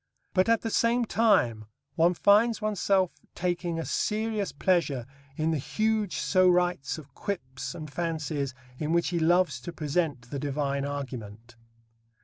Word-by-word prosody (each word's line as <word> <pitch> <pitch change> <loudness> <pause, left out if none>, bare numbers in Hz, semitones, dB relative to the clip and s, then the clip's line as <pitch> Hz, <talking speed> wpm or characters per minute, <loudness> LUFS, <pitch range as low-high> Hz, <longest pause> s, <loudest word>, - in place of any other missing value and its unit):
But 185 +4 +3
at 230 -1 +4
the 225 - -3
same 235 +2 +2
time 185 - +2 0.3
one 170 +2 +3
finds 215 +5 +4
oneself 200 -3 +1 0.2
taking 175 -1 -1
a 165 - -3
serious 210 - -1
pleasure 145 -5 +1 0.3
in 155 +1 +1
the 155 - 0
huge 215 +5 0
sorites 180 -5 +2
of 140 -4 -12
quips 130 -10 -5
and 155 -2 -6
fancies 150 -4 -3 0.2
in 155 +1 -1
which 170 0 +2
he 175 -1 -1
loves 170 -4 +3
to 175 - -6
present 150 -6 -2
the 140 - -3
divine 140 -1 -1
argument. 120 -5 -6
165 Hz, 140 wpm, -28 LUFS, 140-190 Hz, 0.3 s, at